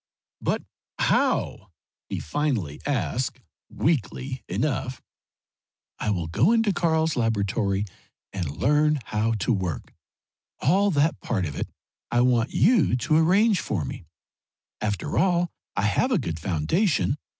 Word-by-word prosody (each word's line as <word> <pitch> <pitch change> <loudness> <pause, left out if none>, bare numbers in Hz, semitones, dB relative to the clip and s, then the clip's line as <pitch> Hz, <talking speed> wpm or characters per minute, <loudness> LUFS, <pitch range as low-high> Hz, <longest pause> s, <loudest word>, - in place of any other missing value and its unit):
"But - - -1 0.3
how?" - - +1 0.4
he - - -3
finally 110 - -2
asked, 130 -2 -1 0.3
weakly 130 - -1
enough. 130 -3 -1 1.0
"I - - -1
will 90 -5 0
go 110 - +3
into 225 -3 +3
Karl's 160 -2 +1
laboratory 105 -3 0 0.5
and 90 -6 -2
learn 150 +1 +3
how 110 +2 0
to 110 +3 0
work 90 - -3 0.7
all 200 +3 +3
that 150 -2 +2
part 95 -6 -1
of 75 -3 -5
it - - -3 0.4
I 120 - +2
want 125 -1 +3
you 190 - +3
to 155 +6 +1
arrange 190 +5 +4
for 100 - -2
me. - - -7 0.7
After 105 +9 -1
all, 175 -2 +2 0.2
I 95 - 0
have 105 - +2
a 245 - +3
good 85 - -3
foundation. 135 - +1
130 Hz, 130 wpm, -25 LUFS, 100-160 Hz, 1.0 s, arrange